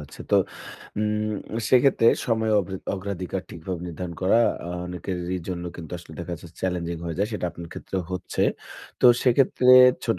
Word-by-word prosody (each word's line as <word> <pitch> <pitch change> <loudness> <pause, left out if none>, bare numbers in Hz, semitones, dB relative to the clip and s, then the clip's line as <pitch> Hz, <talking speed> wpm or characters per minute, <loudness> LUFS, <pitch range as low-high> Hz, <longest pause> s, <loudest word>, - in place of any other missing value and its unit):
যাচ্ছে। 75 - -12
তো - - +5 0.6
উম 105 0 0 0.3
সেক্ষেত্রে 130 -2 +4 0.2
সময় 110 -2 +1
অগ্রা 95 +1 -5 0.2
অগ্রাধিকার 95 -1 -4
ঠিকভাবে 85 +1 -5
নির্ধারণ 85 0 -6
করা, 95 +5 +4 0.5
অনেকেরই 90 0 -4
জন্য 90 -1 -4
কিন্তু 85 0 -9
আসলে 85 - -13
দেখা 85 0 -5
যাচ্ছে, 85 - -11
চ্যালেঞ্জিং 85 -2 -2
হয়ে 85 - -4
যায়। 105 +2 +1
সেটা 100 -4 -2
আপনার 85 0 -9
ক্ষেত্রে 95 - -6
হচ্ছে। 90 0 -2 0.6
তো - - +7 0.2
সেক্ষেত্রে, 125 0 +3 0.4
ছোট, 115 -6 0
90 Hz, 155 wpm, -25 LUFS, 85-105 Hz, 0.6 s, তো